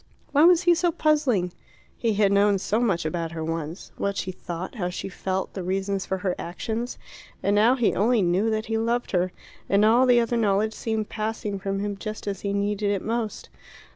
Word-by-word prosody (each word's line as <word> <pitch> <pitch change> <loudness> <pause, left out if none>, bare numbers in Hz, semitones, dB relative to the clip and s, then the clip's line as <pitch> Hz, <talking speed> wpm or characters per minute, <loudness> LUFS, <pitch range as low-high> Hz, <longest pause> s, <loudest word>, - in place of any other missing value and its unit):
Why 295 +3 +5
was 355 0 +6
he 350 -1 +6
so 345 0 +2
puzzling? 290 - +1 0.4
He 225 -3 0
had 200 -1 +3
known 200 0 +4
so 210 +3 0
much 195 -9 +1
about 165 +1 -2
her 160 -1 -4
once 165 +1 -5
what 200 -1 -1
she 185 - -2
thought, 180 0 -6
how 185 -7 -2
she 185 +2 -5
felt, 190 0 -3
the 190 - -4
reasons 195 +2 -2
for 190 - -1
her 185 - +2
actions. 225 +7 -4 0.5
And 200 - +2
now 225 +5 +5
he 240 -5 +2
only 225 +1 +2
knew 185 +5 +2
that 220 0 -1
he 225 0 -1
loved 235 +2 -1
her, 180 -1 +1 0.4
and 200 +2 +4
all 240 +4 +5
the 245 -1 +6
other 235 0 0
knowledge 215 0 +2
seemed 220 -2 -2
passing 215 -2 -3
from 195 0 -2
him 205 -1 -3
just 215 +2 -6
as 200 -1 -3
he 200 - -2
needed 205 +1 0
it 200 -2 -1
most. 225 -1 -3
205 Hz, 205 wpm, -25 LUFS, 190-230 Hz, 0.5 s, was